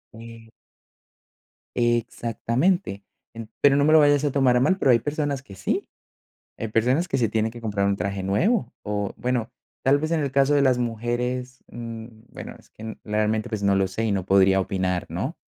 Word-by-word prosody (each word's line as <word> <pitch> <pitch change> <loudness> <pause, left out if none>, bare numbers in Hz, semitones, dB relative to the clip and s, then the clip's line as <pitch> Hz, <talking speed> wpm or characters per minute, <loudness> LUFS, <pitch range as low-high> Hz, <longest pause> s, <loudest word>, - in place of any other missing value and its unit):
E 115 0 -12 1.2
exactamente, 120 - 0 0.6
pero 140 -1 +5
no 140 - +3
me 155 +2 +4
lo 160 - +8
vayas 145 -1 +4
a 145 - +1
tomar 130 -3 +3
a - - +3
mal, 155 +9 +2
pero 135 - +3
hay 120 - +5
personas 145 0 -2
que 100 -7 -13
sí, 95 - -2 0.7
hay 115 - -4
personas 125 +10 +1
que 135 -5 -1
se 115 -3 +1
tienen 110 0 0
que 120 - -11
comprar 100 -3 -1
un 100 0 +1
traje 100 +1 -3
nuevo. 185 - +1
O 105 -1 -3
bueno, 125 -2 -2 0.3
tal 140 +2 +4
vez 155 +2 -2
en 165 -2 +1
el 140 -2 -2
caso 140 +1 +3
de 140 - +3
las 130 -2 +3
mujeres, 125 +2 -3
mm, 115 -1 -7 0.2
bueno, - - -9
es - - -23
que 110 0 -8
realmente, 110 0 -1
pues 110 -2 -4
no 100 -1 +2
lo 95 -1 +2
sé 110 +5 -3
y 110 - 0
no 95 -3 -1
podría 95 0 +4
opinar, 95 -2 -1
¿no? - - -4
115 Hz, 195 wpm, -24 LUFS, 105-135 Hz, 1.2 s, lo